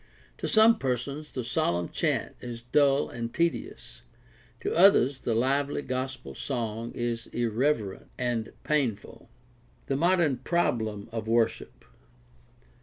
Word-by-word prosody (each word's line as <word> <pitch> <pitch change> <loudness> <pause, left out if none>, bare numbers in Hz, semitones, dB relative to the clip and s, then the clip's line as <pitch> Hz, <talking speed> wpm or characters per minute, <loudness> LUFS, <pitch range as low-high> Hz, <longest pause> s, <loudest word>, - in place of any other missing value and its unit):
To - - -2
some 220 +1 +5
persons 135 +4 -3
the 130 - -4
solemn 90 - 0
chant - - -1
is 120 -1 -7
dull 140 +2 +3
and 115 -1 -5
tedious; 170 +3 -2 0.6
to - - -1
others 160 -7 +5
the 115 - -1
lively 140 +4 +1
gospel 130 - -4
song 115 - -3
is 120 -1 -3
irreverent 115 -3 -1
and 120 -3 -2
painful. 130 -10 -2 0.6
The 135 - -1
modem 170 -4 +3
problem 115 - -1
of 110 -1 -4
worship. 115 0 0
125 Hz, 115 wpm, -28 LUFS, 115-145 Hz, 0.6 s, some